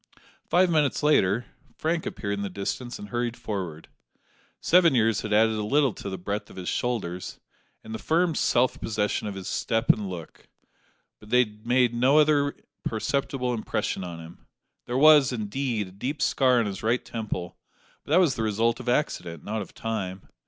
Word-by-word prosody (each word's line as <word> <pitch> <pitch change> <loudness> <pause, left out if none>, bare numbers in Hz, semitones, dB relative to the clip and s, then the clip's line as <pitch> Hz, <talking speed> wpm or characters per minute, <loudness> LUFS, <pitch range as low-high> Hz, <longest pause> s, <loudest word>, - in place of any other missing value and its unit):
Five 180 0 +4
minutes 150 -3 +1
later, 115 -7 +3 0.3
Frank 165 +1 -1
appeared 100 -2 -3
in 100 - -3
the 100 - -3
distance 110 +6 -4
and 105 - -9
hurried 120 +1 -2
forward. 90 -7 -5 0.7
Seven 170 -4 +4
years 115 -3 +2
had 105 - -5
added 110 +1 +4
a 110 - -2
little 135 +2 +2
to - - -7
the 95 - -4
breadth 100 +4 -4
of - - -13
his 90 -1 -4
shoulders, 95 -8 -3 0.4
and 110 - -8
the 110 - -4
firm 170 +1 +1
self 125 -3 +1
possession 105 -1 -1
of 100 - -5
his 95 -2 -7
step 115 +1 -1
and 105 -3 -4
look; 85 -4 -9 0.7
but 105 - -15
they 125 +2 +5
had 105 0 -13
made 125 -1 +3
no 130 +5 +3
other 145 -2 +3 0.3
perceptible 125 +2 -1
impression 110 -3 -2
on 85 -2 -7
him. 85 +1 -13 0.4
There 120 - -1
was, 150 -2 +7
indeed, 115 -1 -2
a - - -13
deep 130 +10 -4
scar 130 -3 +3
on 115 - +1
his 100 -2 -5
right 115 +3 0
temple; 105 -6 -5 0.4
but - - -17
that 165 +5 +5
was 170 -8 +4
the 115 - -4
result 115 +2 +1
of 125 -1 -4
accident, 90 - -1
not 110 +1 -3
of 100 - -10
time. 100 -4 -4
115 Hz, 185 wpm, -26 LUFS, 100-130 Hz, 0.7 s, was